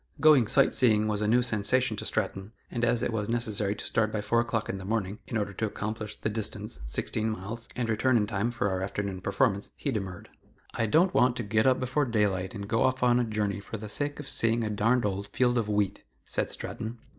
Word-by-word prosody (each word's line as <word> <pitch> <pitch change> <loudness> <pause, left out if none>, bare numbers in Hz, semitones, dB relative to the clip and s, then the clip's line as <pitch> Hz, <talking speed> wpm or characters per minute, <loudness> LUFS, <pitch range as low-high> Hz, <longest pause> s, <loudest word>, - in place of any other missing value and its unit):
Going 145 -6 +6
sight 135 +4 +4
seeing 110 -4 +4
was 105 -1 0
a 105 - +1
new 120 +3 +4
sensation 120 +1 +1
to - - -5
Stratton, 100 0 -2 0.2
and 120 - -2
as 120 0 +2
it 115 - -1
was 105 -1 -2
necessary 110 -4 0
to - - -7
start 110 -1 +1
by 110 - -2
four 105 +3 +1
o'clock 115 -2 -1
in 95 - -3
the - - -8
morning, 105 0 -2
in 115 - -2
order 100 -2 -2
to 110 +3 -1
accomplish 105 +1 -4
the - - -3
distance 105 - -4
(sixteen 110 - -1
miles) 110 +3 -5
and 120 -2 -1
return 120 +3 +2
in 105 - +2
time 105 +2 -1
for 120 -4 -1
our 95 -1 -1
afternoon 100 -1 -3
performance, 100 +1 +1
he 140 - -2
demurred. 95 -6 -5 0.4
"I 115 - 0
don't 170 - +4
want 125 -1 +4
to 120 - -3
get 110 +3 +2
up 130 -1 +4
before 130 +3 0
daylight 100 -5 0
and 100 -1 -5
go 115 +1 +1
off 130 -1 +2
on 125 0 +4
a - - +2
journey 105 -2 -1
for 105 +3 -6
the 105 0 -7
sake 145 +6 -3
of 150 - -7
seeing 115 -2 +1
a 105 - -2
darned 115 +4 +2
old 100 0 -2
field 125 +1 +2
of 110 -2 -2
wheat," 105 -2 0 0.2
said - - -2
Stratton. 110 +2 -6
110 Hz, 235 wpm, -28 LUFS, 105-120 Hz, 0.4 s, Going